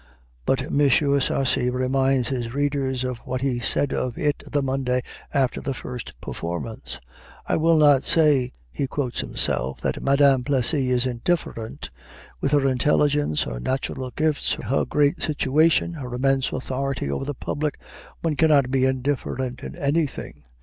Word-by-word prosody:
But 135 - +2
M. 140 - -1
Sarcey 135 -2 +2
reminds 130 0 +1
his 120 -2 -3
readers 140 -3 0
of 125 -2 -3
what 130 0 -4
he 130 -3 0
said 135 +3 0
of 125 -2 -2
it 145 -1 0
the 145 -1 +1
Monday 130 -2 0 0.3
after 135 -3 0
the 135 - -3
first 125 -1 -7
performance. 85 +7 -5 0.5
"I - - 0
will 165 +1 +4
not 145 -3 +6
say" 145 -6 +3 0.2
he 135 - -2
quotes 130 -2 -3
himself 65 +1 0
"that - - -2
Madame 140 -1 +4
Plessy 135 0 +1
is 125 0 +2
indifferent. 120 -2 -3 0.5
With 140 - -1
her 140 -2 +4
intelligence, 145 - +2
her - - -5
natural 130 - -3
gifts, 155 +3 0
her 135 - -1
great 145 -1 +1
situation, 155 +3 +2
her 135 -6 -7
immense 135 +1 +1
authority 130 - -2
over 70 - -2
the 145 0 -4
public, 150 +3 -3 0.4
one 160 -2 0
cannot 145 -4 +4
be 130 -1 +3
indifferent 130 -1 -2
in - - -7
anything. 145 - -2
135 Hz, 150 wpm, -24 LUFS, 125-145 Hz, 0.5 s, not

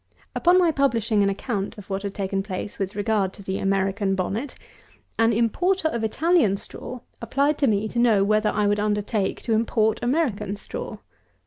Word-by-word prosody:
215. - - -1
Upon 350 +1 +5
my 345 -3 +4
publishing 230 -7 +1
an 200 - +3
account 200 0 -3
of 205 - -11
what 195 0 -1
had 200 -1 -5
taken 195 -1 -1
place 195 0 -6
with 195 0 -3
regard 205 -2 0
to 200 - -12
the 190 0 -3
American 195 0 0
Bonnet, 210 +9 -3 0.6
an 225 0 +4
importer 315 - +1
of 235 -6 -3
Italian 275 - +2
straw 250 +4 -8 0.2
applied 280 +6 +1
to 280 - +3
me 210 -1 +1
to 235 - -3
know 225 -5 +4
whether 215 +1 +2
I 210 - 0
would 205 0 +2
undertake 210 -1 -1
to 230 - 0
import 220 -1 +1
American 240 - 0
straw. 205 - -6
215 Hz, 185 wpm, -24 LUFS, 200-240 Hz, 0.6 s, Upon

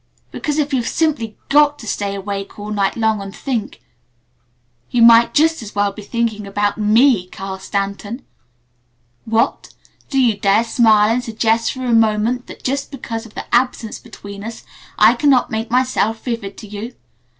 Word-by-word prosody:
Because 295 0 -3
if 295 -2 0
you've 245 -3 0
simply 280 -10 -1
got 295 0 +4
to 225 - -11
stay 200 -2 -2
awake 195 0 -5
all 210 +1 -6
night 200 -2 0
long 220 -2 +1
and 195 0 -8
think 230 - -4 1.1
you 240 -1 +3
might 230 0 +7
just 320 +1 +3
as 215 -2 -9
well 205 0 +1
be 205 - -10
thinking 220 -1 -2
about 205 +1 -1
ME, 215 -1 +4
Carl 190 +1 -7
Stanton. 200 +5 -4 1.0
What? 225 +1 -1 0.3
Do 270 - +1
you 240 -5 +3
dare 200 +3 +3
smile 225 -2 +4
and 245 +1 -1
suggest 225 -1 0
for 260 -1 -6
a 240 - +1
moment 225 +2 +2
that - - -12
just 275 +2 -2
because 230 -4 -6
of 215 - -20
the - - -5
Absence 240 -2 0
between 200 0 -10
us 225 +1 -7 0.3
I 215 +2 +6
cannot 260 0 +2
make 220 +1 -3
myself 245 -3 0
vivid 230 -5 -4
to 215 - -10
you? 210 +4 -7
225 Hz, 170 wpm, -18 LUFS, 205-245 Hz, 1.1 s, might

